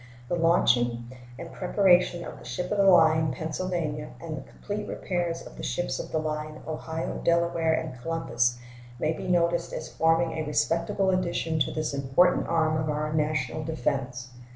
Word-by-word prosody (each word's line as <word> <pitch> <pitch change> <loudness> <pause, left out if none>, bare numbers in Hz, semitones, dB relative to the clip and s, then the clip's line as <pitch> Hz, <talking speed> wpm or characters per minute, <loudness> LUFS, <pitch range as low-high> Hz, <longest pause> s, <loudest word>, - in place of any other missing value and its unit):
The - - +1
launching 120 -8 +2 0.3
and 165 +3 -8
preparation 180 -2 +3
of - - -8
the - - -14
ship 155 +9 -4
of 210 - 0
the 200 - +5
line 160 -4 +5
Pennsylvania 155 0 -3
and 160 -2 -5
the 140 - -6
complete 210 0 -6
repairs 175 -2 -2
of - - -12
the - - -7
ships - - -2
of - - -6
the - - 0
line 155 0 -4
Ohio, 160 +1 -4
Delaware, 170 -1 +2
and 130 -7 -5
Columbus 120 -7 0 0.4
may 155 +6 0
be - - -6
noticed 170 -1 +1
as 155 - -6
forming 165 +1 +3
a - - -1
respectable 170 +5 +1
addition 170 -3 0
to 145 - +1
this 155 -2 -2
important 140 +6 +3
arm 160 -1 +2
of 155 0 -1
our 150 +1 -1
national 150 -1 -1
defense. 130 -5 -2
160 Hz, 170 wpm, -27 LUFS, 150-170 Hz, 0.4 s, the